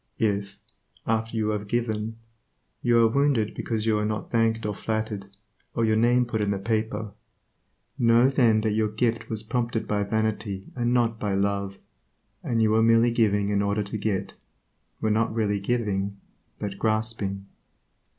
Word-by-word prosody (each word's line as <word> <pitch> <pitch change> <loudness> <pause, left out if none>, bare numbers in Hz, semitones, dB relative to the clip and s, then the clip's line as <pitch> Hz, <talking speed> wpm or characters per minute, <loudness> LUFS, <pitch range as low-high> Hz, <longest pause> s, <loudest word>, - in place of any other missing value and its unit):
If, 100 -2 -1 0.5
after 115 0 -1
you 110 -1 +1
have 105 -1 -2
given, 110 -1 -2 0.6
you 120 -1 +3
are - - +6
wounded 130 -3 +1
because 110 -2 -2
you 110 -1 +2
are 105 - 0
not 105 -1 -3
thanked 115 -1 +1
or 105 - -1
flattered, 110 -1 -3 0.5
or 115 - +2
your 110 0 +2
name 120 +2 +3
put 110 -2 -2
in 105 - 0
the 100 - 0
paper, 110 0 -2 0.9
know 120 +1 +5
then 120 -5 +3
that 110 0 0
your 110 +1 +1
gift 115 +2 -1
was 110 -1 -3
prompted 115 0 -2
by 105 -1 0
vanity 105 -1 -1
and 120 -1 0
not 115 -2 +1
by 100 -2 -1
love, 100 0 -1 0.7
and 115 -2 +1
you 110 - +3
were 110 +1 +4
merely 115 +1 +5
giving 105 -3 +2
in 100 -1 +1
order 100 +1 0
to 100 +2 -5
get; 100 -2 -2 0.7
were 110 - +1
not 110 +1 +1
really 105 -3 +1
giving, 100 -3 -1 0.4
but 100 -1 -5
grasping. 110 -3 -1
110 Hz, 165 wpm, -26 LUFS, 105-115 Hz, 0.9 s, are